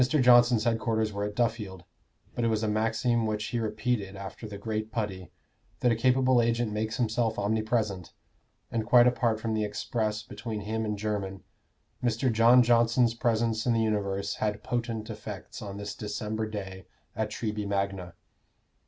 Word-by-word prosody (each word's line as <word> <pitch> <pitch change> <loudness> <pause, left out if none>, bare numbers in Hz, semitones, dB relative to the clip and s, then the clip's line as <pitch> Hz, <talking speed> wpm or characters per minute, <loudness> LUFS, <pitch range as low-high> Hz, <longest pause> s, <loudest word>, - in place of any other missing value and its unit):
Johnson's 125 -4 +5
headquarters 110 -2 0
were 100 0 -2
at 105 0 -5
Duffield; 110 -6 -1 0.5
but 120 - -2
it - - +3
was 110 -1 0
a - - +1
maxim 115 +2 +1
which 105 0 -2
he 120 - -1
repeated 110 -2 -2
after 100 +3 -7
the 100 -1 -7
great 110 +1 -3
Putty, 95 -6 -3 0.5
that 125 - +4
a - - +2
capable 130 +1 +3
agent 115 -1 0
makes 110 +1 -2
himself 115 -1 0
omnipresent; 105 -3 -1 0.6
and 115 -1 0
quite 120 +2 +6
apart 120 -3 +2
from 110 0 -2
the 110 0 0
express 105 +1 -2
between 110 -3 -6
him 110 +2 -2
and 105 -1 -2
Jermyn, 100 -2 -3 0.6
Mr. 120 +1 +1
John 120 +3 +6
Johnson's 120 0 +3
presence 115 -1 0
in 120 - +4
the 115 - +2
universe 100 -2 -1
had 105 -1 -2
potent 115 -2 -2
effects - - -8
on 100 -1 -6
this 100 - -5
December 110 +1 -3
day 95 -3 -7 0.3
at 110 0 -1
Treby 105 -2 -3
Magna. 100 -3 -2
110 Hz, 160 wpm, -28 LUFS, 105-115 Hz, 0.6 s, quite